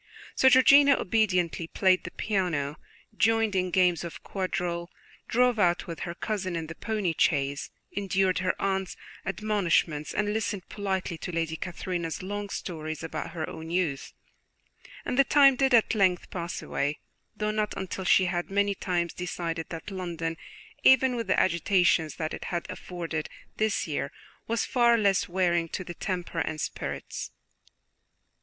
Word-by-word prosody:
So 265 - +5
Georgiana 280 +2 +7
obediently 180 -5 +1
played 185 +1 +2
the - - -4
piano, 170 -8 -1 0.4
joined 225 -1 +2
in 185 -1 +1
games 180 -2 +3
of 170 - -8
quadrille, 175 -2 -3 0.4
drove 245 -1 +3
out 175 -3 +2
with 170 -3 -7
her 170 - -5
cousin 190 -3 -3
in 165 -1 -3
the 160 - -7
pony 210 -3 -1
chaise, 140 -2 +1 0.3
endured 190 -1 +1
her 185 -1 -1
aunt's 190 -1 -1 0.3
admonishments, 190 -7 0
and 210 0 0
listened 210 -4 -2
politely 190 -4 -3
to - - -5
Lady 165 -1 -1
Catherine's 175 0 -4
long 205 +1 -4
stories 155 -4 -5
about 160 -1 -5
her 160 -2 -3
own 160 0 -8
youth; 170 -6 -1 0.9
and 250 - -1
the - - +9
time 275 -1 +6
did 270 +1 +2
at 235 -2 +5
length 190 -4 +1
pass 170 -2 -4
away, 145 +2 -1 0.4
though 210 0 0
not 215 -1 -1
until 190 0 -4
she 185 +1 +5
had 175 -1 -2
many 200 +1 +2
times 175 -3 -1
decided 170 -2 -4
that 165 +5 -7
London, 170 -3 -3 0.5
even 260 -1 +5
with 230 -1 -3
the - - +3
agitations 175 -2 +2
that 155 -1 -3
it - - -6
had 175 -1 -3
afforded 165 -3 -5 0.3
this 215 -3 0
year, 145 -2 -2 0.4
was 230 0 0
far 235 -2 +4
less 200 -5 +2
wearing 175 -2 +1
to 185 - -4
the 175 - -7
temper 180 0 -3
and 155 -1 -2
spirits. - - -4
185 Hz, 155 wpm, -28 LUFS, 170-205 Hz, 0.9 s, the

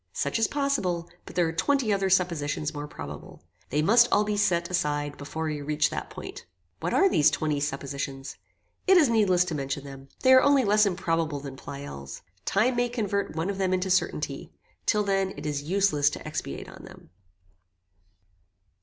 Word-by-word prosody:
Such - - -1
is 225 - +3
possible, 230 -13 -1 0.2
but - - -10
there 175 -2 +3
are 160 - -3
twenty 230 +6 +1
other 195 -1 0
suppositions 160 -5 0
more 145 0 -5
probable. - - -9 0.3
They 150 +3 +1
must 235 +7 +6
all 210 - +4
be 210 0 -1
set 175 -4 +1
aside 145 -4 -1
before 150 +3 -6
we 155 -2 -3
reach 150 +1 +1
that - - -5
point." - - -9 0.4
"What - - -2
are 390 - +4
these 150 - +4
twenty 150 -2 -1
suppositions?" 140 -1 -4 0.5
"It 380 0 +7
is 305 -7 +5
needless 195 -6 +3
to 175 - -4
mention 135 -1 -3
them. 135 -1 -10
They 260 - +6
are 260 - +8
only 280 -1 +4
less 210 +1 +4
improbable 165 -5 -1
than 135 -1 -8
Pleyel's. 135 - -8 0.2
Time 240 +5 +2
may 245 0 +1
convert 205 -7 -2
one 165 +5 -1
of 195 - -7
them 185 -1 +2
into 185 +1 -2
certainty. 155 -6 -1 0.4
Till 210 0 +3
then 195 -1 0
it 145 - -7
is 145 -1 -2
useless 155 -3 +2
to - - -8
expatiate - - -5
on - - -12
them." - - -15
170 Hz, 180 wpm, -27 LUFS, 145-205 Hz, 0.5 s, are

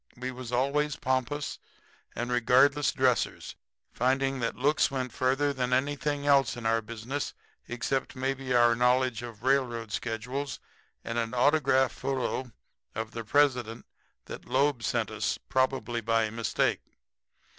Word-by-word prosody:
We 130 +1 -4
was 125 -1 -8
always 140 +4 +1
pompous 130 +3 -2 0.6
and 120 +2 -3
regardless 130 +4 +4
dressers, 130 -4 0 0.4
finding 135 +2 +1
that 115 -1 -1
looks 145 +4 +2
went 130 -2 -3
further 135 +3 +1
than 125 -2 -1
anything 145 +2 0
else 140 -4 +3
in 120 - -7
our 115 0 +2
business, 115 +6 -5 0.3
except 130 +3 -2
maybe 130 0 -3
our 120 -1 +5
knowledge 125 0 +2
of 115 -3 -9
railroad 125 -4 +1
schedules 125 +6 -3 0.4
and 115 +1 -2
an 115 +1 -2
autograph 135 -1 +3
photo 130 -1 -3 0.4
of 110 0 -4
the 115 - -5
President 125 -2 +1 0.4
that - - -9
Loeb 135 -1 +1
sent - - -1
us, - - -1
probably 130 -2 -1
by 115 -1 +1
mistake. 115 0 0
130 Hz, 135 wpm, -28 LUFS, 120-135 Hz, 0.6 s, our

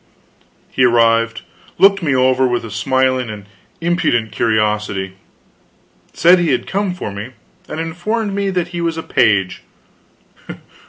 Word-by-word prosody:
He 130 - +1
arrived, 115 -1 +2 0.3
looked 195 0 +5
me 145 -5 0
over 130 0 +3
with 120 -1 -2
a 110 - -9
smiling 130 +2 0
and 105 -2 -8 0.4
impudent 125 -10 0
curiosity; 105 -3 -1 1.0
said 175 +2 +5
he 175 -2 0
had 125 -3 0
come 195 -2 -2
for 145 - -5
me, 100 +6 -8 0.4
and 155 - -5
informed 195 +6 -3
me 200 0 -1
that 180 -2 -2
he 175 -1 -5
was 165 -1 -1
a 160 - -4
page. 95 -3 +1
130 Hz, 140 wpm, -17 LUFS, 115-175 Hz, 1.0 s, looked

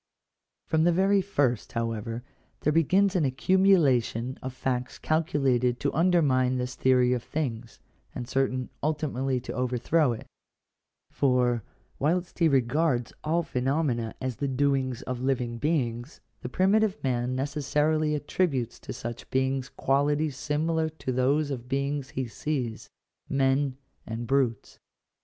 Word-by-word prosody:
From 160 0 +2
the 175 - +4
very 195 +3 +3
first, 140 - 0
however, 115 0 -3 0.4
there 150 - +2
begins 190 +5 +3
an 175 - +3
accumulation 135 - +3
of 130 - -4
facts 125 -1 -3
calculated 135 -7 +1
to - - -1
undermine 145 -8 +3
this 125 0 -3
theory 125 -1 +3
of 125 - -1
things, 120 -6 -4 0.4
and 120 - -5
certain 130 -1 -1
ultimately 135 -4 -1
to - - -6
overthrow 125 +4 +1
it 110 - -8 0.9
For, 125 -3 +2 0.4
whilst 175 +6 0
he 165 - +5
regards 135 -1 +1
all 165 +3 +1
phenomena 130 -5 -1
as 130 -3 -3
the 140 - -1
doings 135 -1 0
of 125 -1 -4
living 125 -3 -1
beings, 130 -4 -1 0.2
the 125 - -5
primitive 200 +6 +2
man 125 -1 0
necessarily 150 +2 0
attributes 145 -4 -1
to - - -7
such 120 0 -7
beings 130 0 0
qualities 145 +2 +1
similar 160 +3 0
to 155 -4 -5
those 140 +4 +1
of 135 - -2
the 120 - -17
beings 140 +1 -2
he 130 -1 -3
sees 125 -2 -3 0.2
— - - -59
men 135 0 +1 0.3
and 115 +1 -4
brutes. 125 -3 0
135 Hz, 135 wpm, -27 LUFS, 125-155 Hz, 0.9 s, he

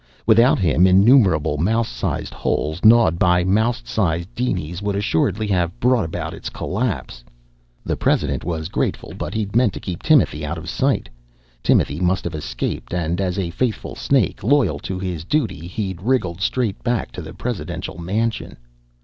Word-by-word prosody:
Without 115 +3 +5
him 90 0 +3
innumerable 95 - +4
mouse 115 +7 +1
sized - - -3
holes, 80 +4 -2
gnawed 110 -7 +5
by 90 0 +3
mouse 110 +6 +1
sized 85 0 -1
dinies, 90 -8 -2
would 100 -1 -1
assuredly 100 +1 0
have 90 -4 -1
brought 125 -2 +3
about 80 0 -4
its 80 - -6
collapse. 95 - -3 0.6
The - - -1
president - - 0
was 80 -2 -3
grateful, - - -2
but - - -5
he'd 105 -2 -3
meant 120 -5 +3
to - - -6
keep 90 -3 -6
Timothy 140 - +3
out 75 +2 -3
of 80 +2 -8
sight. 135 - 0 0.5
Timothy 75 - +2
must 90 +1 +1
have 85 - -4
escaped 80 +3 -4
and 85 +1 -1
as 90 -1 -1
a 90 -3 -2
faithful 115 +4 -2
snake, 130 -11 0
loyal 130 -1 +2
to 95 - -5
his 90 -4 -4
duty, 95 - -1
he'd 95 -1 -4
wriggled 95 -7 0
straight 115 -2 -1
back 120 -4 -1
to - - -7
the - - -9
presidential - - -5
mansion. 110 +7 -2
95 Hz, 165 wpm, -21 LUFS, 85-115 Hz, 0.6 s, Without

